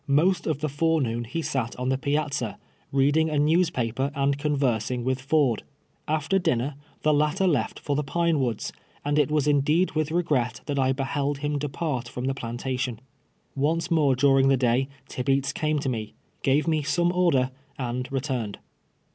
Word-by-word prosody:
Most 160 Hz, +7 st, +2 dB
of 150 Hz, -3 st, -1 dB
the 155 Hz, -, 0 dB
fore 160 Hz, +3 st, +1 dB
noon 120 Hz, -3 st, -2 dB
lie 165 Hz, -, +1 dB
sat 130 Hz, -6 st, -2 dB
on 125 Hz, +1 st, -2 dB
the 130 Hz, -, +2 dB
piazza, 140 Hz, -5 st, -1 dB, 0.3 s
reading 145 Hz, +4 st, +3 dB
a 150 Hz, -, -1 dB
newspaper 140 Hz, -5 st, +1 dB
and 140 Hz, 0 st, +2 dB
conversing 130 Hz, -5 st, 0 dB
with 130 Hz, +1 st, -1 dB
Ford. 135 Hz, -5 st, +2 dB, 0.5 s
After 155 Hz, +5 st, +1 dB
dinner, 145 Hz, -5 st, 0 dB, 0.3 s
the 155 Hz, -, +4 dB
latter 150 Hz, +6 st, +2 dB
left 145 Hz, -11 st, +1 dB
for 145 Hz, -, -2 dB
the 150 Hz, -, 0 dB
Pine 170 Hz, +3 st, +1 dB
AVoods, 120 Hz, -6 st, -1 dB, 0.3 s
and 145 Hz, +1 st, +2 dB
it 145 Hz, -, +3 dB
was 150 Hz, -2 st, +1 dB
indeed 150 Hz, +5 st, +3 dB
with 155 Hz, -1 st, -1 dB
regret 145 Hz, -8 st, 0 dB
that 140 Hz, -2 st, -1 dB
I 130 Hz, 0 st, +3 dB
behold 140 Hz, +1 st, -1 dB
him 145 Hz, 0 st, 0 dB
(U 145 Hz, -, -2 dB
part 135 Hz, -5 st, -3 dB
from 125 Hz, +1 st, -5 dB
the 135 Hz, -, +1 dB
])lantation. 125 Hz, 0 st, -3 dB, 0.6 s
Once 160 Hz, +5 st, 0 dB
more 150 Hz, -5 st, +4 dB
during 135 Hz, 0 st, +4 dB
the 135 Hz, -1 st, +4 dB
day 125 Hz, +1 st, +2 dB, 0.2 s
Tibeats 135 Hz, +1 st, 0 dB
came 155 Hz, 0 st, 0 dB
to 140 Hz, -, -2 dB
me, 110 Hz, -4 st, -3 dB, 0.3 s
gave 140 Hz, +4 st, +2 dB
me 155 Hz, -2 st, +2 dB
some 170 Hz, +4 st, +1 dB
order, 170 Hz, -8 st, +2 dB, 0.3 s
and 125 Hz, 0 st, -3 dB
returned. 130 Hz, -6 st, -2 dB
140 Hz, 175 wpm, -26 LUFS, 130-155 Hz, 0.6 s, the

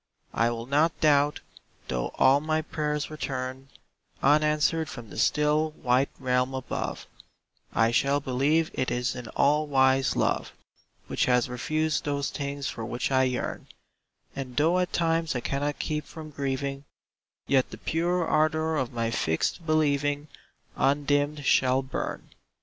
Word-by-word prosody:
I 115 Hz, -, +2 dB
will 115 Hz, 0 st, -4 dB
not 150 Hz, +5 st, +1 dB
doubt, 145 Hz, -1 st, +3 dB, 0.5 s
though 60 Hz, -2 st, -1 dB
all 135 Hz, +2 st, +5 dB
my 155 Hz, +1 st, 0 dB
prayers 150 Hz, -1 st, -2 dB
return 130 Hz, -3 st, -4 dB, 0.6 s
Unanswered 150 Hz, +2 st, +3 dB
from 120 Hz, -4 st, -9 dB
the -, -, -9 dB
still, 150 Hz, +1 st, +2 dB
white 130 Hz, +2 st, +2 dB
Realm 125 Hz, 0 st, 0 dB
above; 130 Hz, -2 st, -4 dB, 0.7 s
I 115 Hz, 0 st, +3 dB
shall 140 Hz, +4 st, +2 dB
believe 145 Hz, +5 st, +1 dB
it 130 Hz, -, -1 dB
is 125 Hz, 0 st, -1 dB
an 125 Hz, -2 st, -7 dB
all 150 Hz, +2 st, +3 dB
wise 135 Hz, -1 st, +3 dB
Love -, -, 0 dB, 0.5 s
Which -, -, 0 dB
has 125 Hz, -1 st, +3 dB
refused 155 Hz, +5 st, -1 dB
those 140 Hz, -1 st, -2 dB
things 140 Hz, -1 st, -4 dB
for 115 Hz, -, -5 dB
which 120 Hz, +4 st, -3 dB
I 130 Hz, 0 st, +4 dB
yearn; 125 Hz, -1 st, -3 dB, 0.7 s
And 130 Hz, -3 st, -6 dB
though 165 Hz, +5 st, +3 dB
at 180 Hz, -, -1 dB
times 165 Hz, -2 st, 0 dB
I -, -, 0 dB
cannot 145 Hz, +3 st, -2 dB
keep 150 Hz, -1 st, -3 dB
from 155 Hz, -2 st, -9 dB
grieving, 140 Hz, 0 st, -3 dB, 0.6 s
Yet 135 Hz, -2 st, +2 dB
the -, -, -9 dB
pure 175 Hz, +2 st, 0 dB
ardor 155 Hz, 0 st, +1 dB
of 130 Hz, -4 st, -1 dB
my 115 Hz, -1 st, -1 dB
fixed 110 Hz, -, -1 dB
believing 145 Hz, -1 st, +1 dB, 0.5 s
Undimmed 145 Hz, +1 st, +1 dB
shall 130 Hz, 0 st, +3 dB
burn. 130 Hz, -, -5 dB
140 Hz, 145 wpm, -27 LUFS, 130-155 Hz, 0.7 s, all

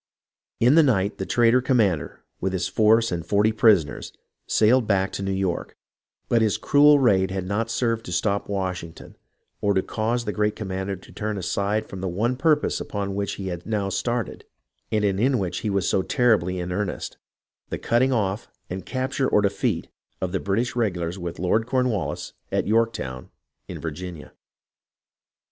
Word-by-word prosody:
In 125 Hz, +4 st, +5 dB
the 165 Hz, -, +7 dB
night, 105 Hz, -8 st, +1 dB
the -, -, -3 dB
traitor 120 Hz, +1 st, +4 dB
commander, 110 Hz, -, 0 dB, 0.2 s
with 95 Hz, -, -2 dB
his 90 Hz, -1 st, -1 dB
force 110 Hz, +1 st, +3 dB
and 85 Hz, -2 st, -2 dB
forty 105 Hz, +5 st, +2 dB
prisoners, 105 Hz, -8 st, +2 dB, 0.4 s
sailed 115 Hz, +2 st, +3 dB
back 95 Hz, -2 st, +1 dB
to -, -, -5 dB
New 95 Hz, 0 st, -2 dB
York; 95 Hz, -3 st, -2 dB, 0.5 s
but 115 Hz, -, +3 dB
his 110 Hz, -3 st, +2 dB
cruel 145 Hz, +1 st, +5 dB
raid 100 Hz, -8 st, +3 dB
had 95 Hz, -1 st, -3 dB
not 105 Hz, +4 st, -1 dB
served 115 Hz, -1 st, -1 dB
to -, -, -7 dB
stop 100 Hz, +4 st, 0 dB
Washington 95 Hz, -4 st, -4 dB, 0.5 s
or 100 Hz, 0 st, +2 dB
to 95 Hz, -, +2 dB
cause 115 Hz, +2 st, -1 dB
the 105 Hz, -, -1 dB
great 105 Hz, 0 st, 0 dB
commander 95 Hz, -1 st, -3 dB
to 95 Hz, -, -15 dB
turn 105 Hz, -1 st, -3 dB
aside 100 Hz, +4 st, -1 dB
from 95 Hz, -, -8 dB
the 95 Hz, -, -2 dB
one 110 Hz, +8 st, 0 dB
purpose 150 Hz, +2 st, +1 dB
upon 100 Hz, -1 st, -3 dB
which 100 Hz, 0 st, -2 dB
he 95 Hz, -1 st, -5 dB
had 85 Hz, -1 st, -6 dB
now 105 Hz, -3 st, -1 dB
started 115 Hz, +5 st, -2 dB, 0.5 s
and 105 Hz, -1 st, +1 dB
in 110 Hz, +7 st, +2 dB
which 95 Hz, -5 st, -2 dB
he 110 Hz, -, -2 dB
was 100 Hz, -1 st, 0 dB
so 95 Hz, -, +2 dB
terribly 95 Hz, -5 st, +2 dB
in 90 Hz, 0 st, -4 dB
earnest, 100 Hz, +1 st, -3 dB, 0.3 s
— -, -, -55 dB
the -, -, -3 dB
cutting 125 Hz, +3 st, +2 dB
off 105 Hz, -4 st, -1 dB, 0.2 s
and 95 Hz, +1 st, -5 dB
capture 130 Hz, +1 st, -1 dB
or 105 Hz, -, +3 dB
defeat 100 Hz, -, 0 dB, 0.3 s
of 95 Hz, -2 st, -2 dB
the 95 Hz, -, -1 dB
British 115 Hz, +6 st, -1 dB
regulars 90 Hz, -6 st, -1 dB
with 85 Hz, -1 st, -5 dB
Lord 110 Hz, +5 st, +1 dB
Cornwallis 125 Hz, -, -1 dB, 0.2 s
at -, -, 0 dB
Yorktown 105 Hz, -, -1 dB, 0.4 s
in -, -, -7 dB
Vir 80 Hz, -, -4 dB
ginia. 85 Hz, -1 st, -8 dB
100 Hz, 175 wpm, -24 LUFS, 95-115 Hz, 0.5 s, the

